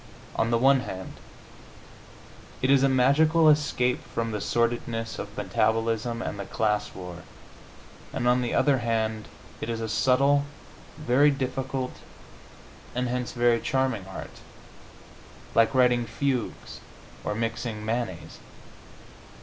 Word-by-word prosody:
On 115 - +1
the 115 - +3
one 135 +3 +5
hand, 95 -6 -7 1.4
it 130 - +4
is 140 -1 +5
a 135 - +4
magical 155 +5 +4
escape 145 -5 +2
from 115 -1 -3
the 105 -2 -3
sordidness 115 -1 -1
of 105 0 -7
metabolism 115 +3 0
and 100 - -5
the 100 - -4
class 105 -1 -1
war, 90 -2 -7 0.9
and 120 - -1
on 125 +1 +4
the 120 - -2
other 140 -3 +3
hand 110 -2 -1 0.3
it - - -4
is 115 -1 -2
a 115 - -3
subtle, 140 +6 +3 0.5
very 145 0 +4
difficult 130 -1 -3 1.0
and 125 0 -1
hence 125 0 -3
very 120 -1 +3
charming 130 -8 -1
art, 95 - -9 1.1
like 115 +4 +3
writing 125 -2 +3
fugues 130 0 -3 0.4
or 105 - -2
mixing 115 -1 -3
mayonnaise. 110 -9 -3
120 Hz, 125 wpm, -26 LUFS, 110-130 Hz, 1.4 s, one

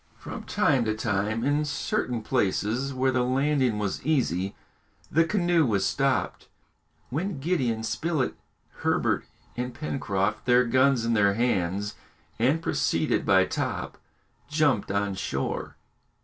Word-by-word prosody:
From - - -8
time 135 -4 +2
to 110 0 0
time, 110 +1 -1
in 145 +3 +2
certain 125 -5 -2
places 120 +3 0
where 130 0 +1
the 125 -1 +1
landing 130 -2 +1
was 105 -2 -2
easy, 100 - 0 0.6
the 165 - +4
canoe 175 -3 +2
was 105 -7 +1
stopped, 135 -1 0 0.6
when 165 +3 -2
Gideon 130 -8 0
Spilett, 155 +3 -1 0.4
Herbert, - - 0 0.3
and 125 0 -4
Pencroft, 105 -9 -2
their 125 0 +5
guns 130 0 +3
in 115 - +1
their 100 -2 +3
hands, 105 -3 0 0.5
and 140 +8 +2
preceded - - 0
by - - +5
Top, - - -3 0.5
jumped 145 -8 +1
on 100 0 0
shore. 95 - -3
125 Hz, 125 wpm, -26 LUFS, 105-140 Hz, 0.6 s, their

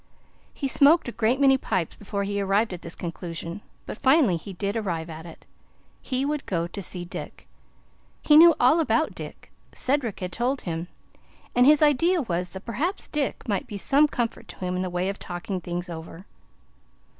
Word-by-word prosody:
He 275 - -3
smoked 290 +4 +5
a - - -3
great 235 +3 +1
many 270 -1 +5
pipes 185 -9 -2
before 200 -1 -4
he 200 0 -2
arrived 200 +2 +1
at 175 - -7
the - - -8
conclusion, 170 +2 -6 0.2
but - - -7
finally 265 - +4
he 190 +4 -7
did 200 +3 -3
arrive 170 -7 -3
at 160 +2 -9
it. 165 - -13 0.6
He 260 0 -1
would 295 0 -2
go 170 -3 0
to 195 +4 -6
see 180 -1 -3
Dick. 175 - -8 0.8
He 295 - +5
knew 330 +1 +9
all 255 +7 +5
about 320 - +1
Dick. - - -10 0.2
Cedric 255 -7 -1
had 180 -1 -4
told 255 +5 -1
him, 165 0 -4 0.7
and 245 +1 +5
his 300 +1 +6
idea 330 +5 +3
was 180 -4 -2
that 190 +3 -9
perhaps 300 - -2
Dick 290 -4 -3
might 200 -4 -1
be 205 - -6
some 280 +9 +4
comfort 240 -5 -3
to - - -10
him 180 0 -2
in 180 - -1
the 185 - -2
way 180 +1 -1
of 200 +1 -3
talking 180 +1 -5
things 175 +1 -4
over. 165 +2 -9
200 Hz, 190 wpm, -25 LUFS, 175-270 Hz, 0.8 s, knew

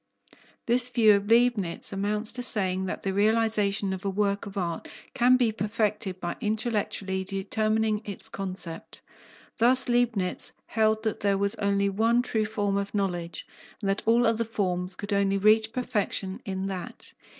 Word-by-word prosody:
This 245 +1 +3
view 225 -4 +5
of 200 0 -2
Leibnitz 230 -7 +2
amounts 210 +2 +1
to 250 - -4
saying 190 -6 0
that - - -5
the 195 - -1
realization 210 -2 +2
of 190 +1 -6
a 200 - -1
work 200 0 -1
of 200 - -9
art 170 -3 -3 0.3
can 250 +1 +4
be 240 -3 +2
perfected 210 -3 -2
by 175 -1 -4
intellectually 210 -3 -1
determining 215 +2 -1
its 200 -3 -6
concept. 185 -4 -7 0.6
Thus 250 +3 +5
Leibnitz 240 -6 +1
held 220 0 +1
that 220 -2 -2
there 200 -1 +1
was 200 +1 0
only 200 -2 0
one 225 +4 +2
true 220 -3 0
form 205 -2 -1
of 200 +1 -3
knowledge, 175 -5 -3 0.3
and 200 - -2
that 195 - -2
all 235 +2 +4
other 225 0 +2
forms 185 -4 -2
could 205 +2 -5
only 200 0 +2
reach 215 +2 +4
perfection 210 -5 -2
in 190 0 -3
that. 190 -2 -7
205 Hz, 160 wpm, -27 LUFS, 195-225 Hz, 0.6 s, view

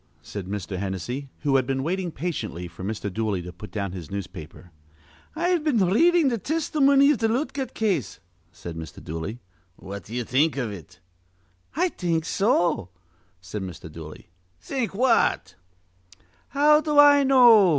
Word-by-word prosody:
said 100 -3 -7
Mr. 95 -2 -4
Hennessy, 100 +9 -4
who 140 -2 +3
had 130 -2 0
been 135 -1 -1
waiting 180 +2 -2
patiently 145 - -4
for 85 +2 -11
Mr. 100 -1 -4
Dooley 110 -2 -1
to 90 0 -8
put 105 +5 -10
down 100 -3 -3
his 90 -5 -8
newspaper. 90 -3 -8 0.6
"I've 345 0 +1
been 295 -8 +2
r 185 -1 +2
readin' 340 +5 +4
th' 230 -4 -3
tistimony 285 -3 +3
iv 290 - 0
th' 225 -1 +1
Lootgert 260 +1 -2
case," 190 - -1 0.3
said 85 -1 -8
Mr. 80 0 -9
Dooley. 80 +10 -5 0.3
"What 100 -2 -9
d'ye 120 +3 -4
think 140 +5 +1
iv 125 -5 -2
it?" 90 -2 -11 0.8
"I 360 +4 +2
think 165 - -1
so," 175 - +1 0.5
said 90 +4 -6
Mr. 90 -4 -8
Dooley. 80 0 -11 0.3
"Think 245 - -3
what?" 230 - +2 0.9
"How 300 +2 +4
do 300 -2 -1
I 290 0 +8
know?" 240 -7 +7
140 Hz, 155 wpm, -25 LUFS, -, 0.9 s, I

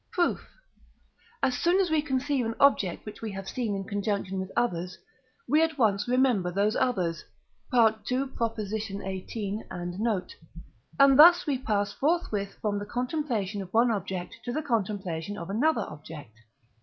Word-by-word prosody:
Proof. 350 -2 0 0.9
As 255 - +2
soon 350 +3 +3
as 370 -4 +1
we 315 -1 +3
conceive 275 -1 0
an 225 - -3
object 215 -10 +3
which 210 - -9
we 220 -2 -4
have 195 0 -7
seen 225 -2 -2
in 195 - -3
conjunction 200 -1 -2
with 190 0 -5
others, 185 -6 -1 0.5
we 300 +5 +4
at 325 -2 +1
once 210 -4 +2
remember 245 -7 +2
those 205 +4 +1
others 180 -9 0 0.5
(II. 235 -3 +6 0.2
xviii. 215 -5 -3
and 175 +1 -5
note), 210 -5 -1 0.6
and 275 0 +6
thus 345 +3 +8
we 280 -5 0
pass 205 -4 -1
forthwith 265 - -1
from 205 -1 0
the 205 - -5
contemplation 245 - -2
of 185 -1 -9
one 235 +1 +5
object 190 -3 -4
to 245 - -3
the 310 +5 -2
contemplation 205 - -2
of 170 +2 -6
another 295 +10 +2
object. 150 -5 -10
215 Hz, 155 wpm, -28 LUFS, 195-260 Hz, 0.9 s, thus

